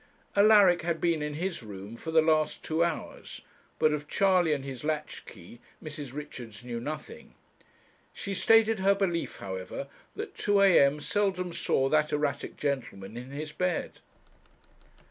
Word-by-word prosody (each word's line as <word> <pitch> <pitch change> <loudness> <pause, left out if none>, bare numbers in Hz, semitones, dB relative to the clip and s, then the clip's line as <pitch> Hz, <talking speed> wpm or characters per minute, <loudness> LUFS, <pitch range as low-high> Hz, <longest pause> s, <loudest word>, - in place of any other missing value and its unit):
Alaric 200 -4 +6
had 165 0 -1
been 170 -3 +1
in 150 0 -3
his 180 0 -3
room 100 0 -9
for 160 - -8
the 160 -1 +4
last 155 -1 +1
two 160 +1 +1
hours, 170 -2 -4 0.4
but 155 - +3
of 145 -1 -4
Charley 185 -4 +3
and 140 -2 -1
his 130 -2 -7
latch 150 0 -3
key 95 +4 -13 0.2
Mrs. 150 -4 -6
Richards 125 -6 -8
knew 120 -1 -4
nothing. 155 - -7 0.8
She 200 - -5
stated 225 +2 +4
her 195 +1 +4
belief, 180 -4 -1
however, 95 -1 -6 0.3
that - - -6
two 205 -1 +1
a.m. 150 -7 +5
seldom 190 -2 -1
saw 135 -4 +1
that 155 0 +2
erratic 150 -2 -2
gentleman 120 -8 -3
in 125 +2 -7
his 150 +2 -6
bed. 180 +1 -2
155 Hz, 150 wpm, -29 LUFS, 135-180 Hz, 0.8 s, Alaric